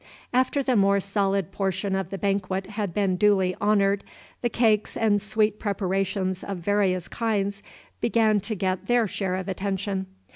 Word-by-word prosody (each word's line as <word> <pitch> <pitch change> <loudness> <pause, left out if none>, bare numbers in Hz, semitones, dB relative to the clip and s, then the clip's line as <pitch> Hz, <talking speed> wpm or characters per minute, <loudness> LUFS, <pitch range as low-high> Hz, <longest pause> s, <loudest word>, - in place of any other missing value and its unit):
After 260 +3 +2
the 255 -2 +1
more 200 -1 +4
solid 195 -1 0
portion 190 0 -1
of 190 -2 -2
the 195 - -4
banquet 195 -1 -1
had 205 -3 -2
been 190 0 0
duly 190 -2 +3
honored, 200 -1 +2 0.4
the 240 - +1
cakes 220 -3 +1
and 210 -2 +2
sweet 210 0 0
preparations 190 -2 -1
of 200 -2 -4
various 185 -1 +1
kinds 205 -3 -1 0.4
began 220 -2 +3
to 205 +3 -4
get 185 0 -2
their 240 -1 +3
share 190 -1 -2
of 185 0 -4
attention. 195 0 -2
200 Hz, 155 wpm, -25 LUFS, 190-210 Hz, 0.4 s, more